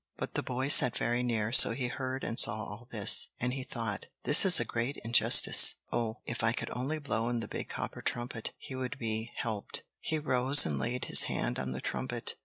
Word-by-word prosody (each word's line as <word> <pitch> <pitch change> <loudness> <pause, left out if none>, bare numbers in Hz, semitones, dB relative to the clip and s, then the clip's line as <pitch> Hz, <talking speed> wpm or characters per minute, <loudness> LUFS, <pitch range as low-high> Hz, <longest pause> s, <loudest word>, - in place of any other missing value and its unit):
But - - -6
the - - -2
boy 130 +2 -4
sat 125 -4 +7
very 120 +1 -2
near, 115 -3 -3
so 115 - +7
he 125 0 -4
heard 130 0 -6
and 115 - -2
saw - - +2
all 110 +2 -9
this, 105 -4 +1
and 125 +1 -3
he 135 - -5
thought: 115 -5 -6 0.2
"This 145 - +6
is 180 -3 +6
a - - -3
great 120 +5 -4
injustice. 115 0 +5 0.2
Oh! 115 -1 -4
if 120 - -6
I 115 0 +1
could - - -6
only 135 +6 -4
blow 120 -6 -3
in 120 -1 -3
the 115 - -7
big - - -7
copper - - -7
trumpet, 120 -2 -5
he - - -11
would 130 -1 -6
be 110 0 -5
helped." 110 -4 -6 0.2
He 160 - -3
rose 135 -1 +5
and 70 -3 -3
laid 120 - -4
his - - +4
hand - - -4
on 65 0 -5
the 65 - -7
trumpet. - - -4
120 Hz, 215 wpm, -29 LUFS, 115-130 Hz, 0.2 s, sat